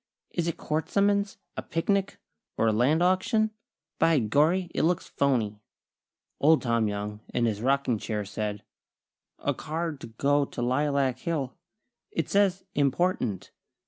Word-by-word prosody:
"Is 170 Hz, -1 st, -1 dB
it 170 Hz, -, -2 dB
court 155 Hz, +1 st, -2 dB
summons, 200 Hz, 0 st, +2 dB, 0.2 s
a -, -, -3 dB
picnic, 195 Hz, +4 st, -1 dB, 0.4 s
or -, -, +2 dB
a 110 Hz, -, +4 dB
land 140 Hz, +10 st, +3 dB
auction? 200 Hz, +4 st, +2 dB, 0.5 s
By 165 Hz, -1 st, +4 dB
gorry, 155 Hz, -, +2 dB
it -, -, 0 dB
looks 170 Hz, +2 st, +1 dB
phony!" 115 Hz, -7 st, 0 dB, 0.8 s
Old 155 Hz, +2 st, +4 dB
Tom 115 Hz, -3 st, +2 dB
Young, 105 Hz, 0 st, -4 dB, 0.2 s
in 120 Hz, -, +2 dB
his 110 Hz, -2 st, -1 dB
rocking 130 Hz, -3 st, +1 dB
chair, 105 Hz, -2 st, -3 dB
said: 105 Hz, 0 st, -4 dB, 0.7 s
"A -, -, -1 dB
card 160 Hz, -1 st, -4 dB
to -, -, -7 dB
go 140 Hz, +6 st, +2 dB
to 135 Hz, -, -5 dB
Lilac 135 Hz, 0 st, +1 dB
Hill. 145 Hz, -6 st, -2 dB, 0.6 s
It 165 Hz, -, -2 dB
says 195 Hz, -2 st, +2 dB
'important.' 140 Hz, -, 0 dB
140 Hz, 145 wpm, -27 LUFS, 115-170 Hz, 0.8 s, a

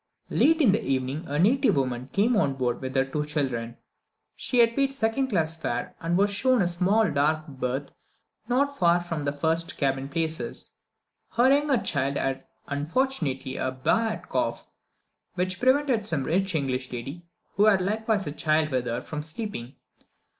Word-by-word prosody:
Late 320 Hz, +1 st, +4 dB
in 245 Hz, -9 st, +6 dB
the 210 Hz, -, +1 dB
evening, 135 Hz, +3 st, -2 dB
a 145 Hz, -, -2 dB
native 250 Hz, -, +3 dB
woman 130 Hz, -1 st, -2 dB
came 220 Hz, +5 st, +2 dB
on 145 Hz, -10 st, +2 dB
board 125 Hz, -2 st, -1 dB
with 130 Hz, 0 st, -5 dB
her 135 Hz, 0 st, +3 dB
two 150 Hz, +3 st, -2 dB
children. 130 Hz, -6 st, -2 dB, 0.6 s
She 250 Hz, -, -2 dB
had 230 Hz, -1 st, +5 dB
paid 275 Hz, -1 st, +1 dB
second 265 Hz, +2 st, +1 dB
class 165 Hz, -8 st, 0 dB
fare, 165 Hz, -, -4 dB
and 170 Hz, +1 st, 0 dB
was 200 Hz, +1 st, +3 dB
shown 255 Hz, +5 st, +2 dB
a -, -, +1 dB
small 190 Hz, +5 st, +2 dB
dark 155 Hz, +2 st, +1 dB
berth 135 Hz, 0 st, -4 dB, 0.6 s
not 280 Hz, +4 st, +1 dB
far 175 Hz, -4 st, +3 dB
from 165 Hz, -4 st, -4 dB
the 140 Hz, -, +1 dB
first 160 Hz, +3 st, 0 dB
cabin 135 Hz, -1 st, -1 dB
places. 160 Hz, 0 st, -3 dB, 0.6 s
Her 255 Hz, +3 st, +5 dB
younger 290 Hz, -2 st, +2 dB
child 140 Hz, -, -1 dB
had, 135 Hz, 0 st, -2 dB, 0.2 s
unfortunately, 145 Hz, -, -1 dB
a 130 Hz, -, -1 dB
bad 220 Hz, -, 0 dB
cough, -, -, -2 dB, 0.7 s
which 185 Hz, 0 st, -1 dB
prevented 260 Hz, -3 st, +2 dB
some 160 Hz, -9 st, -1 dB
rich 185 Hz, +4 st, 0 dB
English 130 Hz, -3 st, -2 dB
lady, 135 Hz, +7 st, -6 dB, 0.3 s
who 205 Hz, -, +4 dB
had 205 Hz, -3 st, +5 dB
likewise 210 Hz, +2 st, 0 dB
a 145 Hz, -, -3 dB
child 155 Hz, 0 st, +1 dB
with 130 Hz, -3 st, -1 dB
her, 120 Hz, +2 st, -2 dB
from 150 Hz, +3 st, -5 dB
sleeping. 155 Hz, -, -5 dB
165 Hz, 170 wpm, -26 LUFS, 135-220 Hz, 0.7 s, in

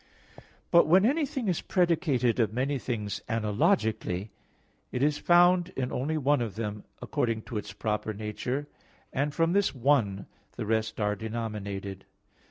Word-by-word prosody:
But 170 Hz, -2 st, +6 dB
when 185 Hz, +5 st, +5 dB
anything 275 Hz, -2 st, 0 dB
is 180 Hz, -4 st, 0 dB
predicated 155 Hz, -10 st, +1 dB
of 110 Hz, -4 st, +2 dB
many 135 Hz, +4 st, -1 dB
things 105 Hz, -5 st, -3 dB
analogically, 110 Hz, -, 0 dB, 0.6 s
it 125 Hz, -, -1 dB
is 145 Hz, 0 st, +2 dB
found 175 Hz, 0 st, +5 dB
in 130 Hz, -1 st, -1 dB
only 150 Hz, +5 st, -1 dB
one 145 Hz, -2 st, +2 dB
of 110 Hz, -5 st, -3 dB
them 105 Hz, -2 st, -4 dB, 0.2 s
according 115 Hz, -2 st, -1 dB
to 115 Hz, -, -5 dB
its 105 Hz, -1 st, -8 dB
proper 105 Hz, +2 st, -2 dB
nature, 110 Hz, +7 st, -4 dB, 0.5 s
and 140 Hz, +2 st, 0 dB
from 165 Hz, +3 st, +1 dB
this 200 Hz, -6 st, +2 dB
one 115 Hz, -7 st, +2 dB, 0.3 s
the -, -, -4 dB
rest 110 Hz, 0 st, -1 dB
are 105 Hz, -1 st, +1 dB
denominated. 100 Hz, -3 st, -5 dB
120 Hz, 145 wpm, -28 LUFS, 105-155 Hz, 0.6 s, But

